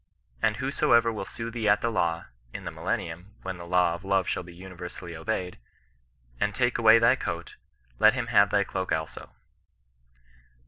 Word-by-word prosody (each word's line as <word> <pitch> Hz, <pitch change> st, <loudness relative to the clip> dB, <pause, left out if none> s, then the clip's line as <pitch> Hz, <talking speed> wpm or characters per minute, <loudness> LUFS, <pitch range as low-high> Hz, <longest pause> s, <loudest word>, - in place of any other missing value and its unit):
^ -, -, -45 dB, 0.4 s
And -, -, +1 dB
whosoever 115 Hz, -1 st, +2 dB
will 105 Hz, -3 st, -5 dB
sue 115 Hz, +3 st, -6 dB
thee 110 Hz, -2 st, 0 dB
at 105 Hz, -, +4 dB
the 115 Hz, -, 0 dB
law" 85 Hz, -5 st, 0 dB, 0.3 s
in -, -, -6 dB
the -, -, -4 dB
millennium, 90 Hz, +5 st, -4 dB
when 95 Hz, -1 st, -5 dB
the 85 Hz, 0 st, -9 dB
law 90 Hz, -1 st, +3 dB
of 85 Hz, -, -7 dB
love 95 Hz, -1 st, +1 dB
shall -, -, -1 dB
be 90 Hz, 0 st, -12 dB
universally 90 Hz, -1 st, -8 dB
obeyed, 90 Hz, -, -3 dB, 0.8 s
and 105 Hz, -1 st, 0 dB
take 120 Hz, -2 st, +1 dB
away 110 Hz, 0 st, +7 dB
thy 115 Hz, +2 st, +5 dB
coat, 85 Hz, -9 st, -5 dB, 0.4 s
let 110 Hz, +3 st, +6 dB
him 125 Hz, -2 st, -2 dB
have 105 Hz, -4 st, +4 dB
thy 100 Hz, -1 st, +2 dB
cloak 95 Hz, -1 st, -4 dB
also." 80 Hz, -1 st, -3 dB
95 Hz, 180 wpm, -27 LUFS, 85-115 Hz, 0.8 s, away